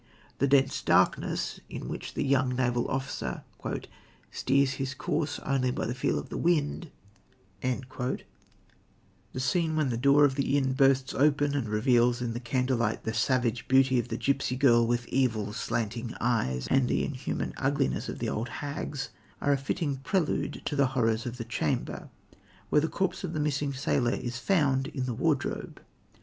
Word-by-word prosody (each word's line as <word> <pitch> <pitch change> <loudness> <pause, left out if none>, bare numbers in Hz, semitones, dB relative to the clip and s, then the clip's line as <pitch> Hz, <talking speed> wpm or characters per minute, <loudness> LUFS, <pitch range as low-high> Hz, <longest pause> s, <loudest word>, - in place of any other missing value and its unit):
The 140 - +3
dense 135 0 +3
darkness, - - +1
in - - -6
which - - -6
the - - 0
young 130 -2 +2
naval 120 -1 0
officer 130 - -3 0.9
"steers 135 +1 +2
his 135 0 -3
course 145 +1 -1
only 135 -2 +1
by 125 - -2
the 120 - -2
feel 130 - 0
of - - -5
the - - -4
wind," 165 -1 +1 0.7
the 130 0 -2 1.2
scene 160 +4 +1
when 155 -4 +1
the 120 - -1
door 140 +4 +5
of 135 - +2
the 140 +1 +1
inn 135 -2 +1
bursts 135 -1 +3
open 145 0 +3
and 135 -6 -1
reveals 120 +2 +3
in 120 -2 -2
the 120 - -3
candlelight 120 -2 0
the 110 - -2
savage 120 0 +1
beauty 130 -1 +4
of 120 - -2
the 115 -1 -3
gipsy 135 -1 0
girl 120 -3 +4
with 120 0 0
evil, 110 -6 0
slanting 115 +1 -3
eyes, 110 - 0
and 135 -2 +4
the - - +1
inhuman 135 -3 -3
ugliness 135 - 0
of - - -5
the - - -2
old 115 +2 -2
hags, 145 +1 -4 0.3
are 145 - +2
a - - +2
fitting 140 0 -2
prelude 160 +5 -1
to 145 - -2
the 140 -1 +4
horrors 115 -1 +1
of 120 +1 -5
the 115 - -5
chamber, 115 - -2 0.6
where 150 - +5
the 160 - +1
corpse 190 +2 -2
of 160 - -3
the 155 - -2
missing 145 -1 0
sailor 130 -2 +1
is 120 -1 -4
found 140 -6 +2
in 135 -4 -3
the 125 - -2
wardrobe. 140 +2 -1
130 Hz, 170 wpm, -29 LUFS, 120-140 Hz, 1.2 s, door